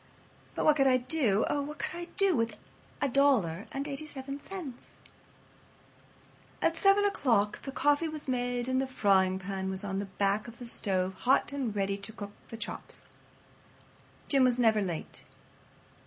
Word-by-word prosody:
But - - -1
what 305 -1 +5
could 270 -1 +4
I 255 -1 +5
do—oh! 255 -1 +1
what 300 +2 -6
could - - -4
I 345 0 -5
do 395 -3 +4
with 230 -3 -1 0.5
a - - +3
dollar 240 -10 +2
and 275 +2 -3
eighty 295 +2 -3
seven 275 -1 -6
cents?" 300 -7 -8 1.7
At - - +2
7 400 0 +4
o'clock 230 - +1
the 270 - -6
coffee 290 +3 +2
was 310 -2 -6
made 245 -1 -1
and 260 0 +1
the 265 - -2
frying 190 -6 +3
pan 190 0 -4
was 190 +1 -3
on 195 -1 -2
the 200 - -3
back 200 +3 0
of 235 0 -10
the 245 - -8
stove 190 -5 0
hot 260 +7 +2
and 255 -7 -2
ready 195 0 -1
to 200 +2 -8
cook 205 -2 -7 0.2
the 225 - -7
chops. - - -7 1.2
Jim 275 -2 +4
was 250 -1 +3
never 220 -3 +4
late. 175 -5 -5
245 Hz, 170 wpm, -30 LUFS, 200-280 Hz, 1.7 s, what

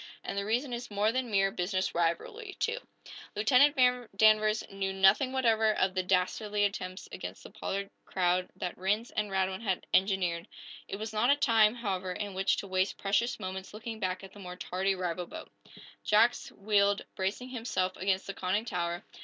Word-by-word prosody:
And - - -4
the 200 0 -1
reason 245 +5 0
is 240 +1 -5
more 205 +1 +1
than 255 0 -1
mere 195 -2 +2
business 185 +1 -1
rivalry, 175 - -2
too." 465 +2 0 0.6
Lieutenant 270 +7 +5 0.4
Danvers 215 0 +4
knew 195 0 -2
nothing 195 +7 +4
whatever 225 -4 +3
of 190 0 +1
the 185 - +1
dastardly 195 +3 0
attempts 185 -2 -4
against - - -7
the - - -11
Pollard 200 0 -4
crowd 180 0 0
that 180 - -4
Rhinds 205 +5 0
and 210 -1 -1
Radwin 190 0 -1
had 195 -5 -1
engineered. 185 -3 +2 0.4
It - - -4
was 220 +2 -5
not 220 +4 +2
a 285 - +6
time, 230 -6 +4
however, 190 -6 -2
in 205 +1 -4
which 195 +1 +1
to 200 - -4
waste 185 0 0
precious 205 +5 0
moments 190 0 -6
looking 220 0 -6
back 185 -2 -2
at 190 - -11
the 205 - -13
more 180 -2 -7
tardy 190 +2 -1
rival 180 -1 -3
boat. - - -9 0.5
Jack 225 +3 +5
wheeled, 200 0 +2
bracing 200 +6 -3
himself 225 -7 -2
against 190 0 0
the 195 - -5
conning 190 +4 -1
tower. 175 -4 -2
200 Hz, 180 wpm, -30 LUFS, 185-220 Hz, 0.6 s, a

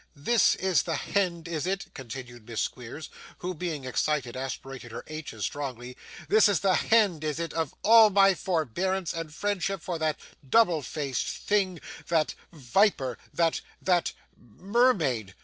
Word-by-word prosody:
'This 210 +11 +3
is 190 -2 +2
the 165 - -2
hend, 175 -1 -1
is 165 0 -3
it?' 190 +1 -1
continued 120 -2 -9
Miss 115 - -3
Squeers, 125 +6 -5 0.3
who, 180 +1 -4
being 160 -5 -4
excited, 130 -1 -1
aspirated 130 -1 -6
her - - -7
h's 155 -9 -5
strongly; 125 -3 -5 0.3
'this 215 -1 +5
is 200 - +1
the 195 -2 +3
hend, 200 -7 +3
is 155 0 -2
it, 170 -1 -3
of 160 -4 -2
all 225 0 +8
my 195 -1 +5
forbearance 180 +2 -1
and 165 -2 -5
friendship 195 +2 -1
for 170 0 -4
that 155 -1 0 0.3
double 180 - +4
faced 140 0 -3
thing 190 -4 0 0.3
that 160 -2 +1 0.2
viper, 140 - +1 0.2
that 165 -1 +1 0.2
that 180 -2 +1 0.2
mermaid? 155 - 0
165 Hz, 150 wpm, -28 LUFS, 135-190 Hz, 0.3 s, all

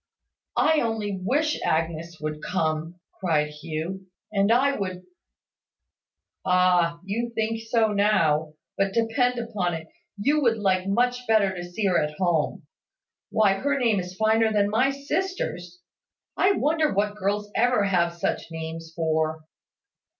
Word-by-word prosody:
"I 315 0 +4
only 215 -4 -2
wish 300 +9 +1
Agnes 165 +1 -1
would 150 0 -4
come," 160 0 -2 0.2
cried 155 -5 +1
Hugh, 165 +5 -6 0.3
"and 200 +1 +3
I 270 +4 +3
would 185 -4 -4 0.7
" - - -62
"Ah! 180 -2 +3
You 225 +5 -2
think 225 0 -1
so 225 -2 +2
now; 160 -7 +2 0.2
but 195 0 +1
depend 245 +2 +1
upon 210 -7 -2
it, 160 0 -7 0.3
you 285 +9 +2
would 235 -4 +3
like 190 -2 +1
much 245 +4 +1
better 210 -4 +3
to 175 -1 -6
see 175 +4 -4
her 185 -3 +3
at 150 0 -3
home. 175 -5 0 0.7
Why, 215 -3 +3
her 280 +9 0
name 230 -6 +2
is 180 0 -6
finer 220 +1 +3
than 205 -1 +2
my 250 +5 +3
sister's! 275 - -3 0.5
I 380 +2 +4
wonder 310 -2 +1
what 205 +1 0
girls 205 +1 -2
ever 245 -2 +3
have 175 -3 +1
such 170 - -2
names 160 0 -6
for!" 160 -1 0
195 Hz, 145 wpm, -25 LUFS, 170-230 Hz, 0.7 s, I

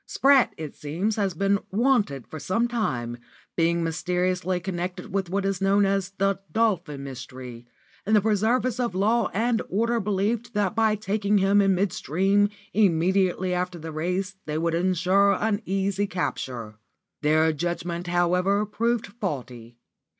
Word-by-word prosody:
Spratt, 275 -2 +4
it 155 -3 -7
seems, 175 +9 -2
has 195 -5 -1
been 200 +3 +2
'wanted' 210 - +1
for 155 - -8
some 225 +10 0
time, 120 - -2 0.4
being 170 0 +2
mysteriously 180 +2 -1
connected 180 0 -5
with 195 -3 -1
what 195 +2 -1
is 195 -1 -1
known 200 +1 +3
as 195 -1 0
the 195 0 +1
'Dolphin 180 -10 0
Mystery'; 125 -2 -9 0.4
and 215 +2 +2
the 210 - +5
preservers 225 +4 +1
of 235 -7 -1
law 220 +4 +2
and 230 +3 +1
order 230 +4 +1
believed 210 +3 -1
that 205 -2 +1
by 220 -1 +2
taking 210 0 0
him 200 +1 +4
in 195 -1 +3
mid 190 0 0
stream, 195 +5 +2 0.2
immediately 185 -1 +2
after 180 0 -2
the 160 0 -7
race, 180 +5 -2
they 150 0 -2
would 165 +1 0
ensure 185 +3 +3
an 215 0 0
easy 195 +1 0
capture. 125 - -4 0.4
Their 155 +1 +3
judgment, 175 +2 -3
however, 180 +4 +2
proved 230 +2 -1
faulty. 130 - -6
190 Hz, 150 wpm, -25 LUFS, 170-205 Hz, 0.4 s, the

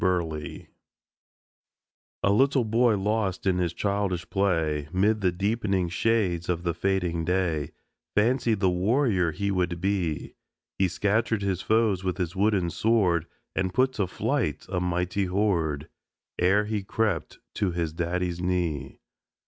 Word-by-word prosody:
BURLEIGH 85 -5 -2 1.6
A 100 - +4
little 135 +3 +3
boy, 115 0 +3
lost 100 -2 -1
in 95 -2 +2
his 85 -2 0
childish 100 -2 -1
play, 80 -7 0
Mid 105 +4 +2
the 90 -2 +2
deep'ning 100 -1 0
shades 95 -3 0
of 85 -1 -1
the 85 -1 0
fading 90 -2 0
day, 85 -4 0 0.5
Fancied 115 -1 +2
the 95 - +4
warrior 95 -1 +2
he 100 +5 -2
would 90 -2 -1
be; 90 -6 -1 0.5
He 95 - +4
scattered 105 +3 0
his 95 -2 -1
foes 110 -4 +2
with 90 -2 -1
his 90 -1 -3
wooden 95 -3 +2
sword 90 -8 +2 0.3
And 95 -1 -1
put 130 +1 +3
to 100 -6 -1
flight - - -1
a 90 -1 -1
mighty 90 +2 0
horde 85 -6 0 0.5
Ere 95 +4 +3
he 105 -1 -2
crept 100 -3 -1 0.2
to 100 -3 0
his 85 -3 -2
daddy's 85 +1 -2
knee. 85 -7 -2
95 Hz, 140 wpm, -26 LUFS, 85-105 Hz, 1.6 s, A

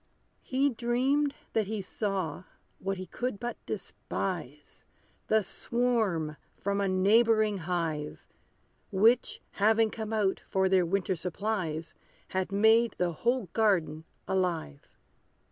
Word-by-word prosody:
He 275 +2 +1
dreamed 260 +5 +1 0.2
that 220 -3 +1
he 215 0 -2
saw, 190 -4 -3 0.3
what 195 0 -2
he 185 - -5
could 245 +3 -4
but 240 +1 -5
despise, 170 -7 -5 0.4
The 220 -1 +3
swarm 200 -8 0 0.2
from 200 0 -1
a 200 - +1
neighboring 215 +2 +3
hive; 160 -4 -2 0.6
Which, 225 +5 +3 0.2
having 220 +1 +4
come 220 -1 -5
out 205 -3 +1
for 190 0 +2
their 185 -2 +3
winter 190 +1 0
supplies, 175 -2 -3 0.4
Had 190 0 -2
made 220 +3 +4
the 180 -1 +1
whole 240 +4 0
garden 170 -8 +1 0.2
alive. 175 - -2
200 Hz, 115 wpm, -29 LUFS, 180-225 Hz, 0.6 s, having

